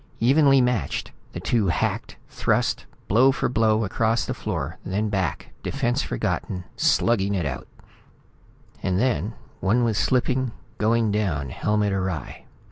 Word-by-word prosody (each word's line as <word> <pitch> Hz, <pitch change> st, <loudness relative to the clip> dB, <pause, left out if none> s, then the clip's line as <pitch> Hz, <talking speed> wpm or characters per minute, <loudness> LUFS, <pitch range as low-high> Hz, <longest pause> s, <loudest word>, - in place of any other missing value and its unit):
Evenly 135 Hz, +2 st, +5 dB
matched, 125 Hz, -, -1 dB, 0.2 s
the -, -, -4 dB
two 110 Hz, -5 st, +1 dB
hacked, -, -, -1 dB
thrust, -, -, 0 dB, 0.2 s
blow 125 Hz, +7 st, +5 dB
for -, -, -1 dB
blow, 110 Hz, -2 st, +2 dB
across 110 Hz, +3 st, +1 dB
the -, -, -2 dB
floor, -, -, -4 dB
then 105 Hz, +3 st, -1 dB
back, 95 Hz, -5 st, -2 dB
defense -, -, 0 dB
forgotten, 90 Hz, +8 st, -2 dB
slugging 100 Hz, -4 st, +2 dB
it 90 Hz, -5 st, -1 dB
out. 65 Hz, -2 st, -4 dB, 1.1 s
And 95 Hz, -1 st, 0 dB
then 110 Hz, -, 0 dB, 0.2 s
one 110 Hz, +6 st, +2 dB
was 110 Hz, -3 st, +1 dB
slipping, 130 Hz, -1 st, +1 dB, 0.3 s
going 110 Hz, 0 st, +2 dB
down, 90 Hz, -10 st, -1 dB
helmet 105 Hz, -1 st, 0 dB
awry. 95 Hz, -5 st, -3 dB
105 Hz, 130 wpm, -24 LUFS, 95-120 Hz, 1.1 s, Evenly